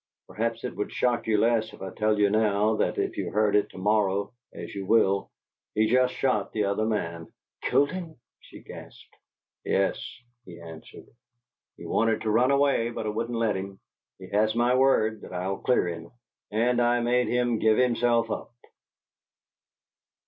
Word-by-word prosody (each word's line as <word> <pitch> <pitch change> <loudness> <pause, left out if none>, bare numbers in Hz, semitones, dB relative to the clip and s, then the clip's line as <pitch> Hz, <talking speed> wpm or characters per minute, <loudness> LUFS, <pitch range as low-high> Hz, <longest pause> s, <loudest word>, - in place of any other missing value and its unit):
"Perhaps 115 +1 -3
it 125 - -5
would 105 - -3
shock 120 -2 0
you 110 -1 +2
less 110 0 +1
if - - -14
I 95 - -5
tell 110 0 0
you 100 -1 +3
now 105 0 +2
than - - 0
if - - -2
you - - -2
heard 105 0 +1
it 105 - +2
to - - -14
morrow, 100 +1 0 0.2
as - - -9
you 100 -1 -6
will. 100 -3 +2 0.5
He's 110 +1 +2
just 125 0 +3
shot 115 -7 0
the 105 - 0
other 100 +2 0
man." 85 -7 -3 0.3
"Killed 145 - +2
him!" 175 -4 -7 0.2
she - - -14
gasped. - - -13 0.5
"Yes," 95 0 0 0.4
he 90 -7 -12
answered. 80 -1 -12 0.7
"He - - -10
wanted 115 -1 +1
to 110 - -1
run 120 +4 +3
away, 140 -4 +2
but 115 - -5
I - - -1
wouldn't 115 +2 -3
let 115 -3 +1
him. 95 0 -6 0.4
He 95 - -11
has 110 +2 +1
my 120 +1 +2
word 110 -5 +2
that - - -11
I'll 95 +2 -2
clear 125 -8 +1
him, 85 -1 -6 0.4
and 120 +3 +1
I 120 0 +3
made 125 +1 +1
him 120 -2 0
give 110 -1 +3
himself 120 -2 +2
up." - - -5
110 Hz, 175 wpm, -26 LUFS, 100-120 Hz, 0.7 s, you